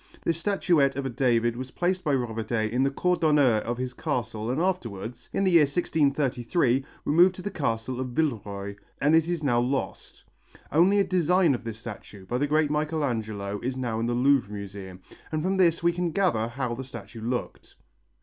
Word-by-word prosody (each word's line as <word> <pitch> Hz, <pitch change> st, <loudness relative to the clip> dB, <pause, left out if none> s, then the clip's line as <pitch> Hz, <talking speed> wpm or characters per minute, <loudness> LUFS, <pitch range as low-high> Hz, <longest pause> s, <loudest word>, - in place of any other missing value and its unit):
This 165 Hz, -1 st, 0 dB
statuette 170 Hz, -8 st, +2 dB
of 140 Hz, 0 st, -3 dB
a 135 Hz, -, -2 dB
David 120 Hz, -1 st, +1 dB
was 130 Hz, +1 st, -6 dB
placed 180 Hz, +5 st, -1 dB
by 145 Hz, -4 st, +2 dB
Robertet 110 Hz, -2 st, -2 dB
in 125 Hz, +2 st, +1 dB
the 135 Hz, -, +3 dB
cour 180 Hz, +6 st, 0 dB
d'honneur 150 Hz, -8 st, +4 dB
of 120 Hz, +2 st, -3 dB
his 125 Hz, 0 st, -4 dB
castle 120 Hz, -6 st, -3 dB
and 130 Hz, +4 st, 0 dB
afterwards, 120 Hz, -, -3 dB
in 195 Hz, -, 0 dB
the 190 Hz, -, +3 dB
year 170 Hz, -2 st, +7 dB
1633, 140 Hz, -3 st, +1 dB, 0.2 s
removed 175 Hz, +5 st, +5 dB
to 185 Hz, -, -9 dB
the 205 Hz, -, -3 dB
castle 125 Hz, -6 st, -2 dB
of 130 Hz, -, -2 dB
Villeroy, 105 Hz, -8 st, -2 dB, 0.2 s
and 150 Hz, +3 st, +4 dB
it 165 Hz, +1 st, +3 dB
is 170 Hz, -3 st, -2 dB
now 120 Hz, -4 st, +2 dB
lost. 130 Hz, +3 st, -3 dB, 0.5 s
Only 180 Hz, +7 st, +4 dB
a 200 Hz, -, +5 dB
design 180 Hz, -3 st, +3 dB
of 120 Hz, -, -4 dB
this 115 Hz, -2 st, -6 dB
statue, 105 Hz, -3 st, -10 dB
by 120 Hz, +6 st, -2 dB
the 145 Hz, -, +1 dB
great 150 Hz, 0 st, +2 dB
Michelangelo, 115 Hz, -10 st, -2 dB
is 130 Hz, +2 st, -3 dB
now 120 Hz, -4 st, -2 dB
in 115 Hz, -, -1 dB
the 120 Hz, -, 0 dB
Louvre 130 Hz, -4 st, +3 dB
Museum, 100 Hz, -2 st, -8 dB, 0.3 s
and 155 Hz, -1 st, -1 dB
from 190 Hz, +2 st, 0 dB
this 170 Hz, -3 st, +3 dB
we 170 Hz, -, +4 dB
can 175 Hz, 0 st, -1 dB
gather 165 Hz, -, +1 dB
how 125 Hz, 0 st, -3 dB
the 130 Hz, +3 st, -5 dB
statue 115 Hz, -3 st, -10 dB
looked. 120 Hz, +2 st, -4 dB
130 Hz, 195 wpm, -26 LUFS, 115-160 Hz, 0.5 s, year